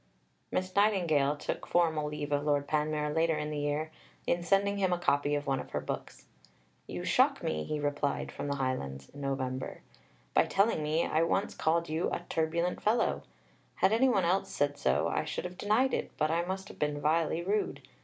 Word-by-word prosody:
Miss 185 0 -2
Nightingale 170 -9 +3
took 150 - -4
formal 160 -3 +2
leave 150 0 -4
of 145 0 +1
Lord 145 -1 +1
Panmure 150 0 0
later 160 0 +2
in 150 0 -3
the 150 - -2
year, 145 +2 -1 0.3
in 175 - +1
sending 200 +3 +2
him 190 -2 +2
a 180 - +2
copy 145 -3 +1
of 145 0 -2
one 135 -2 0
of - - -7
her - - +1
books. - - -6 0.6
"You - - -5
shock - - +3
me," 75 -1 -1
he 150 - -2
replied 145 -1 -1
from - - -5
the 140 - -1
Highlands 70 - -3
(Nov.), 135 -2 -2 0.7
"by - - +5
telling 200 -4 +2
me 155 +2 +1
I 155 - +1
once 165 - +1
called 170 +1 +1
you 160 +3 0
'a - - -2
turbulent 170 +2 0
fellow.' 220 +3 +2 0.5
Had 200 - +3
any 260 +4 +4
one 195 -7 +2
else 185 +3 +1
said 145 0 0
so, 65 - +1
I - - 0
should - - -4
have 180 0 -6
denied 230 +6 +2
it, - - -1
but 155 0 +1
I 165 +1 +2
must 190 +2 -4
have - - -12
been 150 -1 0
vilely 160 +2 +1
rude. 205 +3 -1
155 Hz, 195 wpm, -31 LUFS, 145-180 Hz, 0.7 s, by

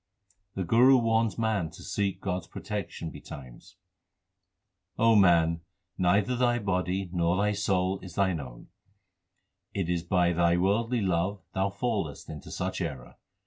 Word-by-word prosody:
The 95 - -1
Guru 125 +8 +6
warns 115 -2 +1
man 110 -7 0
to - - -13
seek 100 -2 -2
God 90 -2 -1
s - - -18
protection 100 -6 -5
betimes: 65 -4 -11 1.2
O 115 0 +5
man, 85 -4 +4 0.3
neither 100 +6 +2
thy 120 -1 +2
body 95 -3 -1
nor 85 0 +1
thy 105 +1 +2
soul 95 -2 0
is 90 -2 -11
thine 95 -4 +1
own: - - -10 1.1
It 95 -4 -1
is 85 -1 0
by 90 0 +2
thy 85 0 +3
worldly 115 +6 +1
love 95 +1 0
thou 95 +1 +1
fallest 100 - -3
into 75 -2 -9
such - - -3
error. 65 -3 -6
95 Hz, 145 wpm, -28 LUFS, 85-105 Hz, 1.2 s, Guru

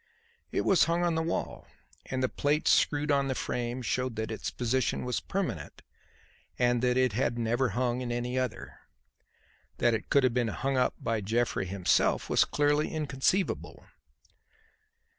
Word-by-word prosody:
It - - 0
was 190 - +4
hung 170 +1 0
on 175 -1 +2
the 160 - 0
wall, 165 +1 -3 0.4
and 130 0 -2
the - - +3
plates 145 +4 +1
screwed 150 0 +2
on 140 -1 +2
the 130 - -1
frame 120 +1 -3
showed 125 +1 -1
that 110 +1 -3
its 110 - -3
position 125 0 -1
was 125 - -1
permanent 175 - -4 0.7
and 120 -1 +2
that 125 0 +2
it 130 -4 +2
had 120 +1 0
never 120 +2 +1
hung 125 0 0
in 120 -1 -3
any 120 +1 -2
other. 130 -3 -3 1.0
That 120 - +3
it 110 - -3
could 140 -2 +4
have 130 -2 +3
been 120 -1 +1
hung 135 +5 -2
up 125 -1 +1
by 115 -2 -1
Jeffrey 110 -1 0
himself 95 -1 +1
was - - +5
clearly 145 +1 +1
inconceivable. 155 +4 -1
125 Hz, 160 wpm, -29 LUFS, 120-145 Hz, 1.0 s, was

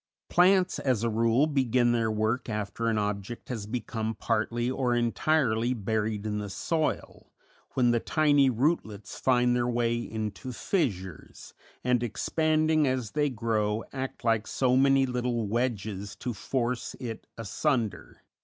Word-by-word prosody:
Plants, 185 +1 +4
as 125 -5 0
a 115 - +1
rule, 115 +5 +3
begin 130 -5 +2
their 115 -2 +1
work 110 +4 -1
after 105 +2 -3
an 110 -1 +1
object 105 +2 -3
has 110 -5 -4
become 110 -1 -3
partly 115 +2 -1
or 125 -2 0
entirely 120 -1 +1
buried 110 -1 -2
in 105 -1 -2
the 105 -1 -5
soil, 155 - -2 0.4
when 125 -2 +4
the 120 - +2
tiny 145 -1 +3
rootlets 115 -5 -1
find 125 -1 +3
their 120 0 +1
way 120 -1 +1
into 110 +2 -5
fissures, 95 - -3 0.3
and, 125 -1 +2
expanding 155 +5 +1
as 130 -5 -1
they 150 -1 +1
grow, 110 -3 -1
act 130 -1 -5
like 115 -2 +1
so 125 -1 +1
many 135 0 +4
little 125 -2 -1
wedges 105 -3 -2
to 125 - -4
force 120 +3 -2
it 115 -4 -6
asunder. 115 - -2
120 Hz, 140 wpm, -28 LUFS, 110-130 Hz, 0.4 s, Plants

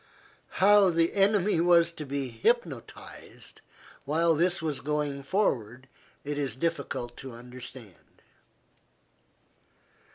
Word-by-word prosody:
How 200 0 +6
the 165 -1 +1
enemy 200 -2 +2
was 170 -1 +4
to 155 -3 -8
be 135 -1 -3
hypnotized 140 - -3 0.4
while 165 +4 +2
this 175 +4 +1
was 155 -4 -3
going 145 -1 -2
forward 130 - -1 0.4
it 145 0 -3
is 135 -6 -2
difficult 130 -5 -3
to 130 -2 -9
understand. 125 - -12
150 Hz, 100 wpm, -28 LUFS, 130-170 Hz, 0.4 s, How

